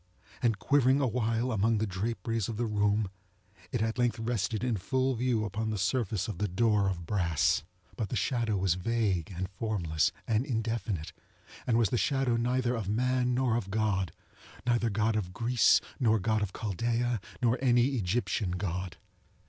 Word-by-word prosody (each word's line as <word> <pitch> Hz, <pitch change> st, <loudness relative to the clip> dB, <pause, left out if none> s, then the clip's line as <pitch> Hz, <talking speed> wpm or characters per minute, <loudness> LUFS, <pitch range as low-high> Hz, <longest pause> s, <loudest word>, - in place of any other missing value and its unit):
And 115 Hz, -4 st, +2 dB
quivering 135 Hz, +6 st, +3 dB
awhile 120 Hz, -1 st, 0 dB
among 110 Hz, +1 st, +2 dB
the 110 Hz, -, 0 dB
draperies 115 Hz, +2 st, -2 dB
of 110 Hz, -, -4 dB
the 120 Hz, -, 0 dB
room, 105 Hz, -2 st, +1 dB, 0.6 s
it 120 Hz, -3 st, 0 dB
at 110 Hz, +2 st, -2 dB
length 120 Hz, -1 st, +2 dB
rested 110 Hz, -2 st, -1 dB
in 120 Hz, -4 st, 0 dB
full 130 Hz, +6 st, 0 dB
view 120 Hz, -2 st, 0 dB
upon 110 Hz, +2 st, -2 dB
the 110 Hz, -, -2 dB
surface 100 Hz, +1 st, 0 dB
of 110 Hz, -, -5 dB
the 105 Hz, -, +1 dB
door 100 Hz, +1 st, +2 dB
of 85 Hz, -3 st, -4 dB
brass. 85 Hz, -4 st, +1 dB, 0.4 s
But 110 Hz, -5 st, -2 dB
the -, -, -2 dB
shadow 115 Hz, 0 st, 0 dB
was 95 Hz, -2 st, +2 dB
vague, 95 Hz, -3 st, 0 dB
and 95 Hz, +1 st, -3 dB
formless, 95 Hz, -6 st, 0 dB, 0.2 s
and 110 Hz, +1 st, +2 dB
indefinite, 110 Hz, -, -2 dB, 0.5 s
and 115 Hz, -2 st, +3 dB
was 115 Hz, -4 st, +3 dB
the 120 Hz, -, 0 dB
shadow 135 Hz, -4 st, +1 dB
neither 125 Hz, +1 st, +1 dB
of 105 Hz, -4 st, -3 dB
man 125 Hz, +2 st, +1 dB
nor 125 Hz, -3 st, +2 dB
of 110 Hz, -5 st, -2 dB
GodŌĆöneither 110 Hz, +3 st, -2 dB
God 110 Hz, +2 st, +1 dB
of 90 Hz, -4 st, -2 dB
Greece, 120 Hz, +3 st, +4 dB, 0.2 s
nor 110 Hz, -4 st, +3 dB
God 110 Hz, +1 st, 0 dB
of 100 Hz, -2 st, -1 dB
Chaldaea, 115 Hz, +3 st, -1 dB, 0.2 s
nor 120 Hz, +1 st, +2 dB
any 120 Hz, -1 st, +4 dB
Egyptian 110 Hz, -3 st, -1 dB
God. 90 Hz, -1 st, -3 dB
110 Hz, 165 wpm, -30 LUFS, 100-120 Hz, 0.6 s, Greece